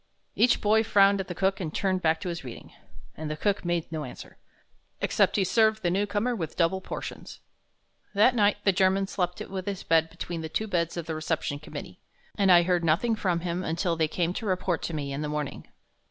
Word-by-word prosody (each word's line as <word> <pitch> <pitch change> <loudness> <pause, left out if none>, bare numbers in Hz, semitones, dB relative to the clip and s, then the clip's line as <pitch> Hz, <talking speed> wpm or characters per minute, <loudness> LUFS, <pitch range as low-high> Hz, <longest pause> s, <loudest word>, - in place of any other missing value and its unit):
Each 240 +1 +4
boy 215 +1 +3
frowned 200 -2 +4
at 190 - -3
the 180 - -5
cook 195 +1 +1
and 165 -5 -3
turned 185 +1 0
back 160 -1 +2
to 185 - -3
his 170 -3 -5
reading. 125 -3 -10 0.4
And 155 -1 -5
the 150 - -4
cook 205 +5 0
made 175 -2 -2
no 155 -2 -3
answer, 125 - -10 0.6
except - - +2
he 200 - +3
served 220 +2 +2
the 175 - +2
new 200 +3 +1
comer 210 +5 0
with 160 -7 -5
double 185 +2 +2
portions. - - -7 0.8
That 215 +5 +5
night 210 -4 +3
the 200 - +4
German 190 +1 +2
slept 180 -2 -2
with 190 -1 -6
his 200 -2 -3
bed 160 0 +3
between 170 0 -6
the 160 - -5
two 220 - -1
beds 170 -5 -1
of 170 - -3
the 165 - -3
Reception 155 -2 -2
Committee, 155 - -9 0.4
and 195 -2 +3
I 175 -1 +7
heard 175 -1 +1
nothing 180 +9 +2
from 180 -5 0
him 175 +1 -2
until 170 +1 -1
they 160 -1 +1
came 170 +2 -1
to 220 +2 -4
report 185 -2 0
to 170 - -4
me 140 -2 -3
in 140 - -3
the 150 - -3
morning. 150 -2 -4
180 Hz, 220 wpm, -27 LUFS, 160-200 Hz, 0.8 s, I